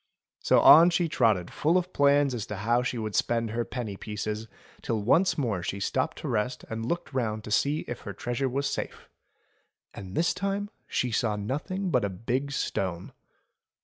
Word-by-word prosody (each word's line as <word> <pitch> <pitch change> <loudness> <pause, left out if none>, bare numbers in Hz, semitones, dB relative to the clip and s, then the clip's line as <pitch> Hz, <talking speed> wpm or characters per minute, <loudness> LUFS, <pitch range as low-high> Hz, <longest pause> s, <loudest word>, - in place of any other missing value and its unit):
So - - +4
on 165 +3 +9
she 175 0 +1
trotted 110 - +1
full 165 +4 +2
of 180 0 -2
plans 140 -1 +4
as 110 -4 -4
to 105 - -5
how 115 +5 +1
she 125 0 -2
would 110 -2 -4
spend 115 0 0
her 120 +1 -1
penny 115 -5 -5
pieces, 105 +1 -4 0.3
till 115 - -1
once 170 - +3
more 115 - -1
she 100 +3 -4
stopped 130 +6 -1
to - - -6
rest 125 0 -1
and 115 0 -3
looked 170 -2 -3
round 110 -4 -1
to 105 - -8
see 145 +8 +2
if 120 - -6
her 100 - -7
treasure 120 +6 -2
was 140 +3 -1
safe. - - -5 0.9
And 95 0 -9
this 170 +2 +2
time 200 +1 -2 0.2
she 125 - -1
saw 110 -1 +1
nothing 160 - -3
but 125 - +2
a 100 - 0
big 125 +9 -2
stone. 95 -9 -3
120 Hz, 185 wpm, -27 LUFS, 105-145 Hz, 0.9 s, on